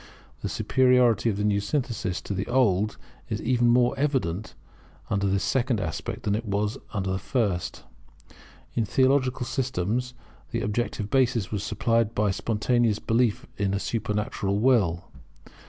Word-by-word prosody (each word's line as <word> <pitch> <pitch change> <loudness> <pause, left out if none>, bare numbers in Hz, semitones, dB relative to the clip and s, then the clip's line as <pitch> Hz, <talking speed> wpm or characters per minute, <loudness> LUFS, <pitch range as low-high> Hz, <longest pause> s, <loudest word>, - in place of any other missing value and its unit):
The - - -3
superiority 125 -5 +3
of 100 - -1
the 105 - -1
new 105 -1 +2
synthesis 100 -4 -2
to - - -4
the 95 +1 -3
old 110 -5 +2 0.3
is - - -2
even 120 0 +2
more 120 0 +4
evident 120 - -1 0.6
under 100 -1 +1
this 95 0 +1
second 125 -3 +1
aspect 80 -5 -4
than 100 - 0 0.6
under 95 -2 -2
the 95 - -1
first. 105 -10 -1 0.9
In 115 - +1
theological 130 +1 +2
systems 125 -1 -2 0.3
the - - -2
objective 105 -1 -2
basis 125 -6 +2
was 105 -2 -2
supplied 115 +1 0
by 105 -1 +2
spontaneous 115 +2 +1
belief 115 -1 +1
in 100 -1 0
a - - 0
supernatural 105 -3 -2
Will. 100 -8 +3
110 Hz, 140 wpm, -26 LUFS, 100-125 Hz, 0.9 s, more